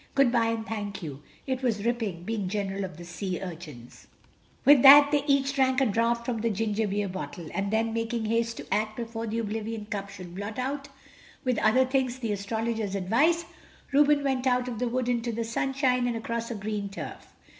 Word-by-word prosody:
Good 275 -3 +4
bye, 235 -2 +3
and 225 -1 -2
thank 205 -4 -5
you. 145 -3 -7 0.2
It 260 -1 -2
was 225 -5 -1
ripping 220 -8 -1
being 205 -2 -2
General 200 -1 -2
of 180 -5 -9
the 175 - -9
Sea 185 +1 -4
Urchins." 160 -10 -9 0.6
With 280 -2 +8
that 285 +2 +10
they 295 - +4
drank 275 -2 +2
each 270 - +3
a - - 0
draught 235 +2 +1
from 235 -3 -2
the 230 - +1
ginger 215 0 0
beer 205 +1 -1
bottle, 180 -3 -6
and 200 0 -1
then, 225 +1 0
making 230 0 -2
haste 230 +1 0
to - - -4
act 215 0 0
before 230 -1 -4
the 220 +1 -2
oblivion 220 0 -3
cup 200 -1 -4
should 185 -3 -10
blot 205 +3 -6
out 275 +2 -3 0.5
with 250 -3 +1
other 255 +4 +4
things 260 -1 0
the 230 -4 -3
Astrologer's 220 0 -2
advice, 265 - +2 0.5
Reuben 290 +1 +4
went 265 -2 0
out 250 0 +2
of 235 -3 -4
the 250 - 0
wood 250 0 -1
into 240 -1 0
the 230 +1 -2
sunshine 250 +1 0
and 240 - -1
across 230 +1 -3
a 235 - -4
green 205 -1 -3
turf. 195 - -9
230 Hz, 200 wpm, -27 LUFS, 205-250 Hz, 0.6 s, that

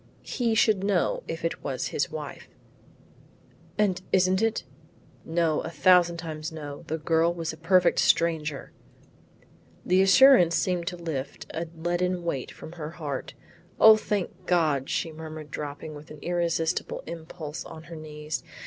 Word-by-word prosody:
He 235 -3 0
should 215 -3 +3
know 355 - +1
if - - -4
it - - +1
is - - -2
his - - -1
wife." - - -7 1.3
"And 195 -3 +1
isn't 185 +1 +3
it?" 225 0 0 0.6
"No, 165 -2 +1
a - - -5
thousand 170 +2 +4
times 155 -2 -5
no; 145 -3 -7
the 160 - -2
girl 165 +1 +2
was 165 -2 -4
a - - -8
perfect 180 +2 +3
stranger." 155 -4 +1 1.1
The 185 +1 +4
assurance 195 -4 +7
seemed 180 -2 0
to 180 -2 -3
lift 145 -5 -5
a 165 +1 -3
leaden 175 +2 -1
weight 140 -7 -2
from - - -10
her 160 -3 -6
heart. 150 -5 -5 0.4
"O 220 0 +9
thank 200 -3 -3
God," 155 -6 +2
she 165 - -1
murmured 155 -1 -9
dropping 150 +2 -6
with 150 +2 -11
an 155 - -10
irresistible 170 -2 -1
impulse 160 -2 -7
on 160 - -10
her 165 0 -10
knees. 150 -1 -5
165 Hz, 150 wpm, -27 LUFS, 155-180 Hz, 1.3 s, O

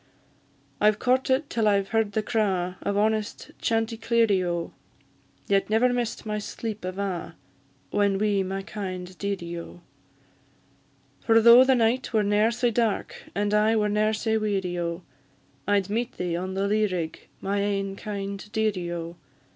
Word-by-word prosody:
I've 210 0 +4
courted 260 +4 +1
till 225 -2 0
I've 200 -1 +2
heard 225 -2 +1
the 220 - 0
craw 195 -6 0
Of 200 - -1
honest 215 0 -1
chanticleerie, 225 -3 +1
O! 170 -1 -3 0.7
Yet 195 0 +2
never 240 +3 +3
miss'd 240 -2 -2
my 210 -1 -2
sleep 215 0 -6
ava, 185 -1 -4 0.6
Whan 200 -1 +2
wi' 205 -1 +1
my 190 +1 -3
kind 185 -3 -6
dearie, 175 -4 -3
O! 170 +1 -11 1.4
For 225 -1 +4
though 235 +3 +9
the 260 0 +4
night 240 +2 +1
were 215 -1 +3
ne'er 205 +2 +3
sae 240 +1 0
dark, 225 -2 -1
And 205 +1 0
I 215 +1 +4
were 210 -1 +2
ne'er 210 +1 +2
sae 220 +1 0
weary, 190 -4 -1
O! 170 +1 -3 0.6
I'd 200 -2 +2
meet 230 +4 -2
thee 175 -2 -2
on 185 +2 -4
the 195 +1 0
lea 215 +1 +2
rig, 170 -4 -4
My 200 +1 -1
ain 195 -1 -1
kind 200 0 -6
dearie, 205 -6 -1
O! 170 0 -5
205 Hz, 155 wpm, -26 LUFS, 190-220 Hz, 1.4 s, though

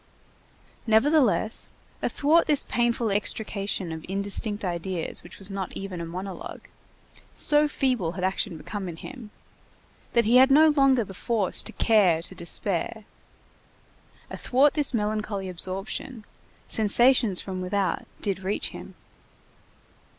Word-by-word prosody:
Nevertheless, 225 -1 +2 0.3
athwart 315 +4 +2
this 295 -2 +4
painful 235 -2 0
extrication 200 -3 -1
of 160 0 -6
indistinct 200 +2 -2
ideas 175 -1 -2
which 175 - -13
was 195 0 -5
not 195 -2 -4
even 190 -3 -6
a 165 - -5
monologue, 185 +2 -7 0.7
so 295 0 +4
feeble 250 - -1
had 185 0 -5
action 190 -1 -1
become 195 +3 -6
in 170 - -7
him, 235 +5 -10 0.9
and 235 -1 +4
he 235 +3 +5
had 260 +1 +7
no 310 +3 +6
longer 275 -4 +4
the 195 - -10
force 210 -1 0
to - - -5
care 190 -8 +3
to 190 - -5
despair, 185 +4 -2 1.3
athwart 275 +3 +2
this 295 -2 +2
melancholy 210 -3 -2
absorption, 195 +6 -4 0.4
sensations 225 -1 +3
from 185 -1 -5
without 190 +1 -1 0.2
did 195 -3 -1
reach 190 +2 -2
him. - - -10
205 Hz, 125 wpm, -26 LUFS, 185-240 Hz, 1.3 s, had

